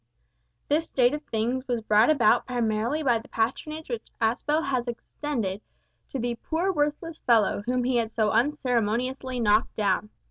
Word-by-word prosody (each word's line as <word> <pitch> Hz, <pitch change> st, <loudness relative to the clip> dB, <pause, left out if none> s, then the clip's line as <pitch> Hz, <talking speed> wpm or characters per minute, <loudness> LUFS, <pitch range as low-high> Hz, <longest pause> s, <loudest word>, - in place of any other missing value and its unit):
This 310 Hz, +3 st, +1 dB
state 250 Hz, 0 st, +3 dB
of 295 Hz, -, -3 dB
things 245 Hz, +3 st, -2 dB
was 245 Hz, -2 st, 0 dB
brought 215 Hz, +2 st, +4 dB
about 240 Hz, -6 st, +4 dB
primarily 240 Hz, +4 st, 0 dB
by 240 Hz, -5 st, +3 dB
the 225 Hz, -, -14 dB
patronage 305 Hz, +7 st, -2 dB
which 235 Hz, -3 st, -5 dB
Aspel 290 Hz, +8 st, +1 dB
had 255 Hz, -3 st, -1 dB
extended 235 Hz, -4 st, -4 dB, 0.5 s
to -, -, -4 dB
the 240 Hz, -1 st, -2 dB
"poor 345 Hz, +4 st, 0 dB
worthless 300 Hz, +2 st, -2 dB
fellow" 220 Hz, -4 st, +3 dB
whom 250 Hz, 0 st, +1 dB
he 250 Hz, 0 st, +1 dB
had 230 Hz, -2 st, 0 dB
so 220 Hz, -2 st, +1 dB
unceremoniously 250 Hz, 0 st, 0 dB
knocked 210 Hz, -1 st, +2 dB
down. 205 Hz, 0 st, 0 dB
245 Hz, 155 wpm, -26 LUFS, 225-285 Hz, 0.5 s, brought